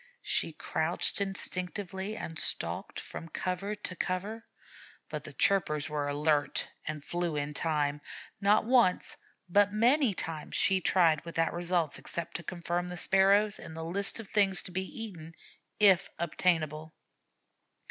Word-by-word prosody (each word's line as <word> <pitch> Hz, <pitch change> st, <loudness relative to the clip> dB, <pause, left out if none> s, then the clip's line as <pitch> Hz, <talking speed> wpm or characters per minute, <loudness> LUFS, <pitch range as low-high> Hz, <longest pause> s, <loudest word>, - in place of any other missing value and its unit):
She -, -, +1 dB
crouched -, -, -1 dB
instinctively 190 Hz, +1 st, -2 dB
and 165 Hz, -1 st, -5 dB
stalked -, -, -1 dB
from 165 Hz, -, -8 dB
cover 185 Hz, +5 st, -3 dB
to 195 Hz, -3 st, -5 dB
cover, 205 Hz, +6 st, -3 dB, 0.6 s
but -, -, -5 dB
the -, -, -9 dB
chirpers 160 Hz, -6 st, +2 dB
were 150 Hz, -1 st, -2 dB
alert 145 Hz, 0 st, +1 dB, 0.2 s
and 150 Hz, -1 st, -4 dB
flew 175 Hz, -2 st, -2 dB
in 145 Hz, 0 st, -2 dB
time. 150 Hz, -2 st, 0 dB, 0.4 s
Not 205 Hz, +2 st, +3 dB
once, 235 Hz, -6 st, +3 dB, 0.3 s
but 200 Hz, +3 st, +4 dB
many 235 Hz, +1 st, +3 dB
times, 160 Hz, -3 st, -4 dB
she 190 Hz, -1 st, +4 dB
tried 165 Hz, -5 st, +3 dB
without 165 Hz, -1 st, -1 dB
result 175 Hz, -2 st, -1 dB
except 170 Hz, -1 st, -3 dB
to 170 Hz, -, -10 dB
confirm 175 Hz, +1 st, -3 dB
the 180 Hz, 0 st, -6 dB
Sparrows 195 Hz, +3 st, +4 dB
in 160 Hz, -, -9 dB
the 160 Hz, 0 st, -5 dB
list 200 Hz, +6 st, 0 dB
of 225 Hz, -, -7 dB
things 195 Hz, -2 st, +2 dB
to 185 Hz, -, -4 dB
be 190 Hz, +1 st, -1 dB
eaten 180 Hz, -8 st, -7 dB, 0.5 s
if 195 Hz, -3 st, +5 dB
obtainable. 160 Hz, -2 st, 0 dB
180 Hz, 140 wpm, -30 LUFS, 160-200 Hz, 0.6 s, if